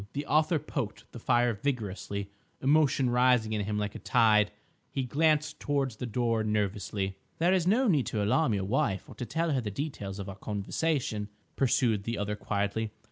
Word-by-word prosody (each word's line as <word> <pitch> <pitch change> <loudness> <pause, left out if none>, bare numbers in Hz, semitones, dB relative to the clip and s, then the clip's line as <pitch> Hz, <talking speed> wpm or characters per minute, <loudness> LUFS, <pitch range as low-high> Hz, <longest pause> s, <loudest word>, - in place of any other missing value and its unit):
The 145 +1 -3
author 155 +3 +3
poked 135 -6 -5
the 120 - -9
fire 120 +1 +2
vigorously, 100 -4 -3 0.3
emotion 140 -2 +3
rising 125 -3 +3
in 105 -2 -1
him 105 0 -2
like 105 -1 -2
a - - -7
tide. 110 -3 +4 0.4
He 135 - -2
glanced 150 +3 +1
towards 135 -5 -1
the 125 - -4
door 115 -1 0
nervously. 100 -2 -1 0.2
"There 175 +3 +3
is 180 -2 +2
no 240 +7 +4
need 150 - +2
to 105 -2 -1
alarm 110 +3 +2
your 95 -1 -1
wife 100 -3 0
or - - -10
to 120 +2 -6
tell 165 +1 0
her 135 -3 +1
the 110 - -3
details 100 -5 -5
of 100 -1 -6
our 100 - -6
conversation," 105 +2 -2 0.3
pursued 115 -5 +2
the 115 0 -2
other 105 +1 -2
quietly. 105 +1 -1
115 Hz, 185 wpm, -29 LUFS, 105-140 Hz, 0.4 s, tide